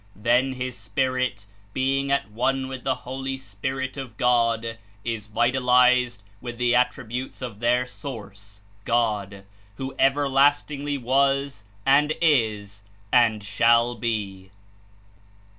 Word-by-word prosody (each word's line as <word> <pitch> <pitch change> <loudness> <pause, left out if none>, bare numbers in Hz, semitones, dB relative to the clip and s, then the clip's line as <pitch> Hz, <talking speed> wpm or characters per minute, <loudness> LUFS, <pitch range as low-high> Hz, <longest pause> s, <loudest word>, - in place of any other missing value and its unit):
Then 125 +5 +2
his 125 -1 -4
spirit, 125 -1 -2 0.3
being 135 +1 0
at 120 -7 0
one 130 +4 0
with 130 -1 -7
the - - +1
Holy 135 +1 -4
Spirit 130 +4 -5
of 125 -5 -7
God 115 -2 +1 0.2
Is 115 -3 -4
"vitalized 125 -1 +3 0.2
with 120 -1 -6
the 120 0 +2
Attributes 125 0 -1
of 120 -6 -7
their 120 +2 +2
Source, 100 -7 -10 0.2
God, 105 -5 -1 0.3
who 135 +4 -5
everlast 140 +1 +3
ingly 145 0 -3
was, 135 -1 +1 0.2
and 145 +3 +4
Is, 110 -10 +1 0.3
and 115 -4 +4
shall 115 +3 +3
be." 105 -5 -4
125 Hz, 115 wpm, -24 LUFS, 110-135 Hz, 0.3 s, and